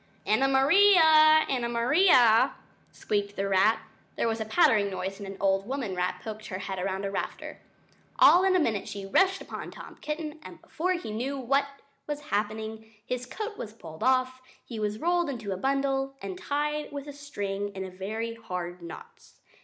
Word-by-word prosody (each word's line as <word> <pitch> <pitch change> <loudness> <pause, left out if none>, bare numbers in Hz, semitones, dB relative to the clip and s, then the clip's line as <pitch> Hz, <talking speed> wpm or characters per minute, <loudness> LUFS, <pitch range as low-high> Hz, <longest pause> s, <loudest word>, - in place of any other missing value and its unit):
"Anna 230 +6 +3
Maria! 310 +1 +6
Anna 245 -3 -1
Maria!" 240 - +4 0.4
squeaked 205 -1 -2
the 195 - -1
rat. 200 +3 +3 0.3
There - - 0
was 225 0 -2
a - - -2
pattering 215 -1 +3
noise 195 +1 -5
and 200 - -7
an 195 0 -8
old 195 0 +1
woman 255 -8 -3
rat 180 0 -2
poked 215 -1 -7
her 185 - -5
head 190 -1 -4
round 195 +1 -2
a 195 - -3
rafter. - - -5 0.6
All 360 - +7
in 380 -1 +3
a - - +4
minute 220 - -1
she 200 -1 -6
rushed 380 - +2
upon - - -7
Tom - - -11
Kitten, 305 0 -5
and - - -11
before 365 +3 -2
he 345 -11 -5
knew 255 +6 -3
what 275 +2 +1 0.4
was 295 -1 -3
happening...... 220 +1 -3
his 250 0 -4
coat 425 - -6
was 215 - -6
pulled 160 -8 -12
off, 255 0 +2
and 255 - -29 0.2
he 230 -3 -7
was 210 0 -2
rolled 345 +3 +1
up 260 -4 -4
in 205 -3 -5
a - - -1
bundle, 270 +4 -1
and 195 -2 -5
tied 295 +8 -2
with 285 0 -7
string 205 -8 -4
in 190 -1 -6
very 220 +5 -4
hard 180 -5 -6
knots. 460 - -12
230 Hz, 185 wpm, -27 LUFS, 200-285 Hz, 0.6 s, All